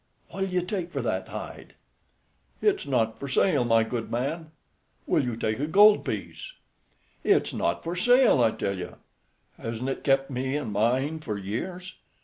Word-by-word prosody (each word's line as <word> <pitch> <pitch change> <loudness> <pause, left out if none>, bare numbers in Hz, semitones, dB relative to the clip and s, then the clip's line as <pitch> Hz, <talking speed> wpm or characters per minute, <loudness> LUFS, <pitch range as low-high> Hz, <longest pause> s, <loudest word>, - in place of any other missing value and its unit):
"What'll 195 0 -3
you 180 -1 0
take 180 -2 -4
for 140 -5 -3
that 95 -5 -2
hide?" - - -8 0.9
"It's - - +1
not 115 -5 0
for 140 - -5
sale, 140 0 +2
my 115 -1 +3
good 115 0 -4
man." 155 +7 -3 0.6
"Will - - +2
you 120 -3 -2
take 110 -1 -1
a 145 - -1
gold 205 +5 +6
piece?" - - -5 0.7
"It's - - +2
not - - -1
for 170 +2 -3
sale, 245 - +5
I 115 - +5
tell 100 -2 -3
you. 90 - -7 0.6
Hasn't 115 +3 -4
it 135 - -4
kept 135 0 +2
me 130 +2 -2
and 120 -8 -4
mine 130 +9 +1
for 110 -9 -4
years?" 175 - -5
135 Hz, 165 wpm, -26 LUFS, 115-175 Hz, 0.9 s, gold